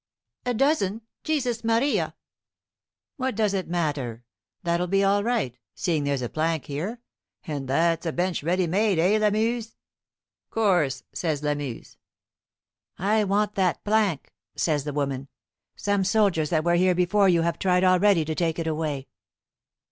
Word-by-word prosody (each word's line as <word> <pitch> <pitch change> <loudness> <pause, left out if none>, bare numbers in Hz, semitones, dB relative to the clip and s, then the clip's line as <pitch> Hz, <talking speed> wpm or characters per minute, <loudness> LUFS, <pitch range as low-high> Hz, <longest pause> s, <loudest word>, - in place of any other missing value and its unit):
"A 245 - +1
dozen. 225 -6 +1 0.2
Jesus 250 -7 -1
Maria!" 230 +5 +1 1.0
"What 260 -3 -2
does 210 -2 +1
it 190 -2 -2
matter? 145 -9 -2 0.4
That'll 170 +1 0
be 195 +2 +2
all 200 +1 +3
right, 220 - -1 0.2
seeing 160 -6 0
there's 140 -2 -1
a - - -1
plank 160 -1 -1
here 175 +12 -4 0.5
and 145 -5 -4
that's 165 +4 +1
a - - 0
bench 175 +1 -1
ready 180 +4 +1
made, 195 +3 +1
eh, 190 +6 +3
Lamuse?" 220 +2 0 0.7
"Course," 175 - +1
says 155 -4 -2
Lamuse. 145 -5 -4 1.0
"I 210 +3 +2
want 205 +2 +1
that 185 -4 0
plank," 205 -7 0 0.2
says 150 -4 0
the 150 - -3
woman. 140 -2 -2 0.5
"Some 205 -1 0
soldiers 190 -6 +2
that 155 -2 +1
were 170 +1 +2
here 180 +1 +3
before 190 +3 +3
you 170 -2 +3
have 170 -1 -1
tried 180 -1 +2
already 185 -2 +4
to 160 - -2
take 165 0 -1
it 165 - -2
away." 155 -4 -2
180 Hz, 150 wpm, -25 LUFS, 155-210 Hz, 1.0 s, already